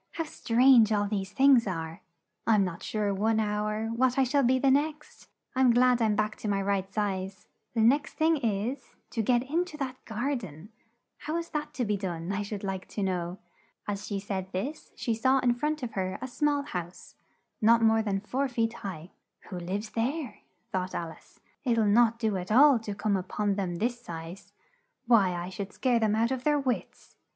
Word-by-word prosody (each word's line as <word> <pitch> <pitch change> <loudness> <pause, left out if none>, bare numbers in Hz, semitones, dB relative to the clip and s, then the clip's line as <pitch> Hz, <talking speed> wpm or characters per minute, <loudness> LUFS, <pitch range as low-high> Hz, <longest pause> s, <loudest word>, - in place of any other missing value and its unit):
"How 330 - -2
strange 245 -5 +4
all 205 -1 +2
these 195 -2 -3
things 265 -4 +5
are! 165 -3 -4 0.5
I'm 215 -3 +5
not 180 -3 -4
sure 210 -2 -1
one 220 +3 +1
hour, 215 +1 -1
what 250 +3 +1
I 270 - +5
shall 280 +3 +2
be 260 0 +3
the 270 +1 +3
next! 300 +2 -1 0.3
I'm 260 -1 +4
glad 245 0 +4
I'm 215 -2 +2
back 215 +1 -1
to - - -6
my 200 -1 +1
right 195 -1 -1
size: 195 -2 -3 0.3
the 225 - +2
next 275 +7 +3
thing 320 0 +3
is, 230 +1 -3 0.2
to 225 - -1
get 240 +2 +2
in 315 +7 0
to 310 -4 -10
that 260 -3 -5
gar 240 +6 -1
den 190 - -8 0.5
how 310 +2 -3
is 335 0 -4
that 300 -2 -4
to 250 -2 -1
be 210 -1 0
done, 175 -2 -4
I 200 +1 -1
should 205 0 -5
like 190 -1 -4
to 205 - -4
know?" 180 -1 -2 0.5
As 205 0 -4
she 200 -2 -2
said 190 -1 -4
this, 265 +12 -4
she 230 - -1
saw 260 +4 +3
in 250 -2 +3
front 300 +4 -2
of 240 - -3
her, 185 -2 -2
a 260 - -5
small 290 +2 0
house, 180 - -7 0.5
not 230 +1 +5
more 225 0 +4
than 200 -3 -1
four 265 +6 -1
feet 230 -2 -1
high. 180 -3 -7 0.4
"Who 180 - -4
lives 200 +5 -4
there?" 250 +1 -2 0.3
thought 185 0 -2
Al 165 -1 -3
ice, - - -19 0.2
"it'll 230 -4 +2
not 230 +2 +4
do 220 -4 0
at 180 +2 -5
all 270 +2 +7
to 210 -2 -6
come 205 0 0
up 185 +1 -5
on 205 -1 +2
them 190 -3 -2
this 240 +6 -2
size: 165 -2 -9 0.5
why 205 -7 +4
I 175 +1 -4
should 195 +1 -6
scare 245 -3 +1
them 215 -1 +2
out 230 +3 +1
of 260 -1 -2
their 295 0 +3
wits!" 260 -3 -4
220 Hz, 205 wpm, -28 LUFS, 195-255 Hz, 0.5 s, all